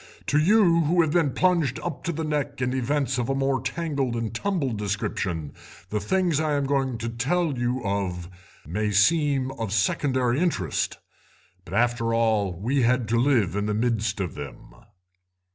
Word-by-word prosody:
To 145 - +2
you, 170 -2 +4
who 170 +3 +3
have 160 -3 +1
been 165 -3 +3
plunged 165 -3 +1
up 170 -5 -5
to 170 - 0
the 160 0 -3
neck 145 -3 -2
in 125 0 0
events 130 0 0
of 120 - -2
a 135 - +1
more 135 0 0
tangled 135 -2 -2
and 115 -1 -3
tumbled 135 - -1
description, 95 -6 -3 0.4
the 105 - 0
things 170 - +1
I 155 -1 0
am 140 -1 +1
going 135 -3 0
to 115 +1 -4
tell 145 +7 0
you 120 +1 -1
of 95 -4 -2 0.4
may 105 +8 -1
seem 135 - +2
of 110 -3 -3
secondary 125 +4 +1
interest, 160 - -1 0.7
but - - -6
after 115 -1 +1
all 110 -4 +2
we 130 +7 +1
had 125 -1 +2
to 115 +1 +2
live 120 - +2
in 105 0 -1
the 105 - 0
midst 110 -2 0
of 95 -4 -2
them." - - -9
125 Hz, 175 wpm, -25 LUFS, 110-150 Hz, 0.7 s, you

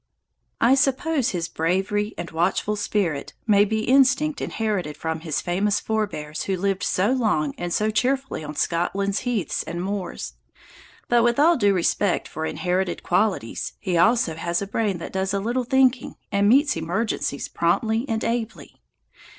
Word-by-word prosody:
I 235 +3 +5
suppose 275 +1 +1
his 170 -2 -2
bravery 195 +6 -1
and 170 0 -6
watchful 180 +5 0
spirit 190 -8 -2
may 205 -2 +5
be 220 +1 -1
instinct 275 +4 +3
inherited 195 -9 -2
from 160 0 -3
his 160 -2 -2
famous 195 +4 0
forbears 200 -9 -3
who 190 -1 -1
lived 195 +1 -1
so 195 +6 +1
long 210 - +1
and 175 0 -4
so 215 +4 +1
cheerfully 260 -1 -1
on 150 0 -7
Scotland's 195 +5 0
heaths 235 -7 -1
and 170 +1 -5
moors. 190 0 -4 0.7
But, 240 -1 +4
with 240 0 +2
all 335 +4 +5
due 205 -7 +3
respect 180 +2 +1
for 160 +1 -4
inherited 180 0 -2
qualities, 185 - 0
he 180 - -2
also 220 -1 +3
has 170 +2 -2
a 200 - -3
brain 200 -1 -1
that 170 - -8
does 190 +1 -1
a - - +1
little 240 +5 -1
thinking 260 0 +2 0.2
and 200 0 +3
meets 280 +4 +4
emergencies 170 -3 -2
promptly 220 +9 0
and 220 -1 -1
ably. 230 -1 -4
200 Hz, 160 wpm, -23 LUFS, 175-230 Hz, 0.7 s, I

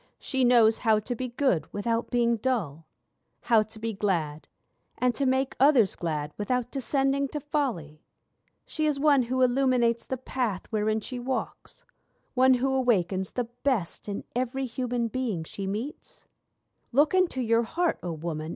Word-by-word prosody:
She 265 -2 -1
knows 235 -3 +5
how 220 -3 +3
to 215 +4 -3
be 255 +2 -3
good 245 - 0
without 230 +3 -1
being 235 -1 +2
dull; 190 - -2 0.5
How 225 -2 +4
to 220 +1 -7
be 225 +1 -3
glad 165 -7 -2 0.5
and 250 -1 +2
to 275 +1 0
make 265 +1 +1
others 260 -8 +5
glad 150 -3 -3
without 245 +3 -1
descending 275 0 +1
to 295 - -5
folly; 235 - -3 0.6
She 310 -1 -1
is 290 -2 0
one 285 -2 +4
who 255 +2 0
illuminates 250 -2 +2
the 260 - -2
path 245 -6 -3
wherein 215 0 0
she 250 +3 -5
walks; 255 +1 -5 0.5
One 260 0 +5
who 265 +2 0
awakens 190 -8 +1
the 245 - 0
best 235 -5 -2
in 200 - -4
every 255 +2 -1
human 245 -1 -2
being 225 -8 -2
she 195 +4 -6
meets'? 225 +10 -6 0.7
Look 290 +6 +3
into 370 -7 +2
your 230 0 +3
heart, 330 +9 -1
O 175 - -4
Woman! 160 -1 -4
240 Hz, 160 wpm, -27 LUFS, 205-260 Hz, 0.7 s, knows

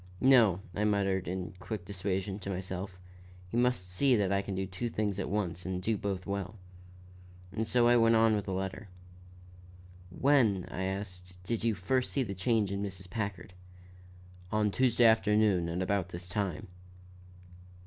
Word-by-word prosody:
"No," 115 -9 +5
I 105 - -1
muttered 100 -3 +1
in 90 0 -4
quick 105 -2 -5
dissuasion, 95 0 -3
to 100 - -6
myself. 95 0 -5 0.5
"He - - -6
must 120 -6 +1
see 125 +9 +3
that 100 -4 +1
I 100 0 +2
can 100 -1 -5
do 95 0 -1
two 95 +6 -4
things 105 -3 -2
at 100 - -2
once 95 -4 -2
and 95 -1 -3
do 110 +4 0
both 95 -2 -3
well." 100 0 -4 1.0
And 110 0 -2
so 120 +2 +3
I 120 - +6
went 115 0 +5
on 110 0 +5
with 105 -1 -1
the 95 - -3
letter. 95 +2 -4 1.2
"When," 110 -3 +3
I 95 - -3
asked, 90 -2 -6
"did 115 +4 -2
you 115 -2 +2
first 125 +8 0
see 135 - +1
the 100 -5 -4
change 100 +1 +1
in 100 0 -2
Mrs. 95 -2 -6
Packard?" 100 -4 -4 1.0
"On 105 -1 +2
Tuesday 120 0 +3
afternoon 105 -5 +4
at 90 +2 -1
about 95 -2 0
this 90 0 -7
time." 95 -2 -2
100 Hz, 170 wpm, -31 LUFS, 95-110 Hz, 1.2 s, I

